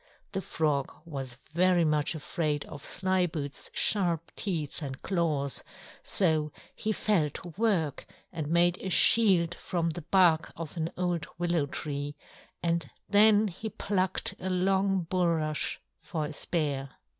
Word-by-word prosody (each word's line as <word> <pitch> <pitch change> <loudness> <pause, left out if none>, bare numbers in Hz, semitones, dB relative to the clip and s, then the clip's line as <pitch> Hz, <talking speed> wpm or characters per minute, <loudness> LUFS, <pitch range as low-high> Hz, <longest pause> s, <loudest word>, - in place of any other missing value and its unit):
The 195 - -2
Frog 150 -6 0
was 135 -6 -6 0.2
very 175 0 +4
much 150 +1 +1
afraid 150 -1 -2
of 145 - -9
Slyboots's 180 -6 -1
sharp 170 -6 +1
teeth 165 -7 -3
and 135 -3 -5
claws, 155 -7 0 0.4
so 155 -5 +1 0.2
he 215 - -1
fell 200 -8 +1
to 175 +5 -8
work 175 - 0 0.3
and 155 -3 -3
made 175 +2 +3
a 190 - -4
shield 180 -1 +5
from 170 -2 -2
the 175 - -6
bark 170 -1 +3
of 165 -1 -6
an 165 -1 -1
old 175 -2 -1
willow 170 -4 +1
tree, 145 0 -4 0.5
and 170 -3 0 0.2
then 210 +1 +6
he 195 +4 -5
plucked 195 -3 -1
a 190 - -3
long 190 +1 +2
bulrush 165 -4 0 0.2
for 160 -5 -3
a 150 - -6
spear. 145 -4 -2
170 Hz, 135 wpm, -29 LUFS, 150-185 Hz, 0.5 s, then